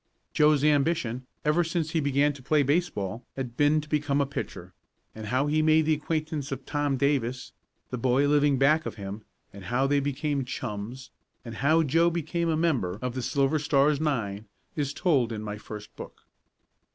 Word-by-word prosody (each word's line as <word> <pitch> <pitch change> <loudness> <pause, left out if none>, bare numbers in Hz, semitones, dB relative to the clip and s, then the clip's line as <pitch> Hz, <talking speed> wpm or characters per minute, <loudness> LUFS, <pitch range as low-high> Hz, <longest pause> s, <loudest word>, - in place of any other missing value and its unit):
Joe's 150 -2 +4
ambition, 145 -5 +1 0.2
ever 150 +4 +3
since 165 -1 -2
he 165 - +1
began 145 0 +2
to 140 - -12
play 145 +3 +2
baseball, 135 - -1
had 125 -3 -5
been 145 +3 +3
to 150 - -12
become 150 -2 0
a 140 - +2
pitcher, 140 - -6 0.4
and 110 -1 -8
how 130 +5 +1
he 155 +1 +2
made 155 0 +4
the 160 - +3
acquaintance 155 -2 -3
of 135 -1 -5
Tom 145 -2 -1
Davis, 130 -3 0 0.4
the 125 - -3
boy 130 +4 +2
living 145 -1 +3
back 150 +4 +3
of - - -6
him; 100 +1 -7 0.3
how 120 +7 -1
they 140 +1 +2
became 140 0 -1
chums, 125 0 -6 0.3
and 115 -2 -7
how 155 +5 +3
Joe 165 +4 +3
became 170 0 -2
a 160 - +1
member 130 - 0
of 125 0 -3
the 130 - -3
Silver 140 +4 +1
Stars 145 0 +2
nine 110 -9 -2 0.3
is 145 -3 -1
told 140 -7 +1
in 110 -1 -4
my 105 0 -5
first 105 -1 -10
book. - - -11
140 Hz, 180 wpm, -27 LUFS, 125-155 Hz, 0.4 s, Joe's